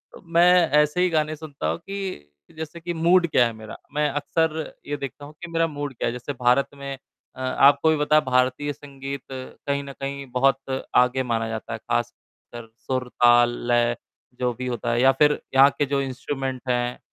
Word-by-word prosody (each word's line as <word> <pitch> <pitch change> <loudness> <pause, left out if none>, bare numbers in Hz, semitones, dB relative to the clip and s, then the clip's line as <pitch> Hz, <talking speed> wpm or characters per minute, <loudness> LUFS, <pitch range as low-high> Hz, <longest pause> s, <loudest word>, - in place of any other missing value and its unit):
अब - - -14
मैं 175 0 +6
ऐसे 150 +4 0
ही 180 - +3
गाने 155 -2 0
सुनता 145 - -6
हूँ 80 +1 -1
कि, 195 - -6 0.3
जैसे 160 +1 -7
कि 175 +1 -4
मूड 170 +2 +3
क्या 130 -6 +4
है 115 - -2
मेरा, 110 0 -10 0.2
मैं 150 0 +1
अक्सर 160 +2 -1
ये 145 - -2
देखता 140 +1 -7
हूँ 145 - -12
कि 175 -1 -8
मेरा 165 0 +2
मूड 145 -2 -5
क्या 115 - -2
है। - - 0
जैसे 125 +3 -5
भारत 125 +2 +2
में 140 -1 -6 0.4
अ, - - -13
आपको 140 +4 +4
भी 160 - +3
पता 150 +1 +2
है 155 - +6
भारतीय 130 +3 +1
संगीत 140 -1 -8
कहीं 140 +2 -4
न 140 0 -9
कहीं 140 0 -4
बहुत 135 +1 +1
आगे 125 +1 +4
माना 115 -2 -1
जाता 110 -1 -5
है, - - -5
ख़ासकर 120 -1 -5
सुर, 130 -1 -3
ताल, 120 0 +5 0.2
लय 120 0 +2 0.4
जो 125 -1 +1
भी 125 +2 -5
होता 120 -1 -2
है 120 +1 +1
या 135 - +6
फ़िर 150 +3 +3 0.2
यहाँ 135 +1 +8
के 145 - +2
जो 140 0 0
इंस्ट्रूमेंट 135 -1 -4
हैं, 120 0 0
140 Hz, 200 wpm, -24 LUFS, 125-150 Hz, 0.4 s, यहाँ